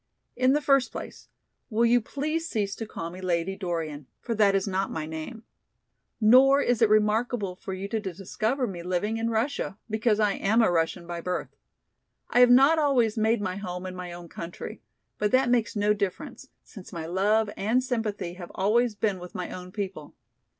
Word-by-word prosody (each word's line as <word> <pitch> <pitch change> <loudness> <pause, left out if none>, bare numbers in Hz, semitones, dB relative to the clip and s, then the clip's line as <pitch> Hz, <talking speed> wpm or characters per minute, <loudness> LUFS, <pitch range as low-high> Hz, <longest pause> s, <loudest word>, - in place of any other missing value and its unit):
In 255 +2 +3
the 295 - +2
first 275 -2 +3
place, - - -9 0.4
will 230 0 +2
you 240 +1 +4
please 310 +7 -3
cease 200 -3 -1
to 225 - -5
call 165 -5 -6
me 185 +2 -9
Lady 180 +1 -1
Dorian, 165 -7 -4
for 235 - -3
that 205 -3 +3
is 195 +1 0
not 195 0 -1
my 155 -1 -4
name. 160 +9 -7 0.8
Nor 260 +5 +6
is 245 -4 +1
it 225 - +5
remarkable 215 -1 +1
for 190 +1 -6
you 190 +1 -5
to 220 - -1
discover 215 +6 -2
me 185 -6 -6
living 185 +5 -1
in 225 0 -1
Russia, 230 -2 -1
because 220 0 +1
I 210 -1 +3
am 215 +4 +1
a 200 - +3
Russian 165 0 0
by 170 0 -5
birth. 180 +1 -4 0.8
I 245 - +4
have 250 0 +8
not 275 +6 +6
always 255 -7 +2
made 220 0 +2
my 185 -1 -3
home 180 -2 -5
in 185 0 -6
my 180 -1 -6
own 175 0 -9
country, 170 +1 -8 0.4
but 210 - +2
that 260 -1 +4
makes 235 -3 +1
no 210 0 +3
difference, 200 -3 -4 0.2
since 195 -5 -12
my 165 -3 -5
love 205 +5 +1
and 230 +6 +1
sympathy 215 -8 -2
have 175 -1 -9
always 220 +4 +2
been 205 -2 -1
with 180 0 -10
my 180 - -4
own 180 0 -8
people. 190 -7 -6
210 Hz, 190 wpm, -27 LUFS, 180-235 Hz, 0.8 s, have